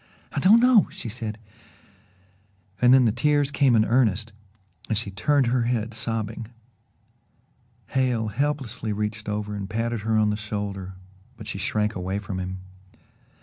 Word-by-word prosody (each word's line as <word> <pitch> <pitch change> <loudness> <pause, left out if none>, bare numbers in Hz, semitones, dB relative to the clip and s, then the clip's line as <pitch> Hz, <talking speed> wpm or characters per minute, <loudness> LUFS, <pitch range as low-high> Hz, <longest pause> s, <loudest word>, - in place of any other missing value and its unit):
"I - - -2
don't 215 +5 +6
know 245 -3 +5
" - - -18
she 115 - -7
said 110 -2 -5 1.4
and 125 0 +6
then 130 -1 +6
the 110 - +4
tears 145 +4 +1
came 140 -4 +3
in 110 -1 +4
earnest 115 -3 +1 0.6
and 110 - +1
she 105 -3 -3
turned 140 +7 +2
her 120 0 +1
head, 115 -2 -1
sobbing. 115 0 -4 1.4
Hale 125 -4 0
helplessly 125 -3 -2
reached 105 +1 -3
over 105 0 -3
and 100 -1 -5
patted 115 +1 -1
her 110 +1 0
on 105 -1 +3
the 105 - -2
shoulder, 100 -3 -5 0.4
but 110 - -9
she 100 - -5
shrank 105 +2 0
away 95 +1 -3
from 100 -2 -5
him. 95 0 -5
110 Hz, 155 wpm, -25 LUFS, 105-125 Hz, 1.4 s, don't